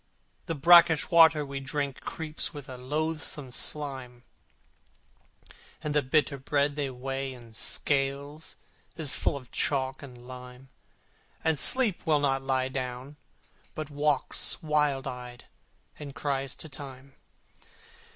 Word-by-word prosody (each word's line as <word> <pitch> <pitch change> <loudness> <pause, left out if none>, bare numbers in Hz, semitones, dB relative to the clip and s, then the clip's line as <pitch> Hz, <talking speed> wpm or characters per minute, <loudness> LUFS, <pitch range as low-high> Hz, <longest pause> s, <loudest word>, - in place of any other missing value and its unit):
The 165 - -2
brackish 170 +2 +6
water 165 -2 +7
that - - -3
we 140 0 -5
drink 140 0 -3
Creeps 160 0 -5
with 145 -2 -8
a 130 - -7
loathsome 150 +1 -3
slime, 130 -4 -2 1.6
And 150 - -2
the 150 - +3
bitter 140 +1 +1
bread 140 +1 0
they 145 -2 -2
weigh 135 +1 -4
in 120 -2 -14
scales 140 +6 -1 0.4
Is 155 -5 +1
full - - 0
of 130 -3 -13
chalk 135 -2 0
and 125 -3 -12
lime, 125 +1 -11 0.7
And 160 -3 +1
Sleep 245 -8 +5
will 155 -3 +3
not 135 -2 +1
lie 130 -1 0
down, 130 +2 -5 0.6
but 155 -1 -5
walks 145 0 +1
Wild 150 -3 +1
eyed, 125 -1 -7 0.5
and 140 -2 -8
cries 135 -2 -2
to - - -9
Time. 135 -1 -10
140 Hz, 130 wpm, -28 LUFS, 130-150 Hz, 1.6 s, water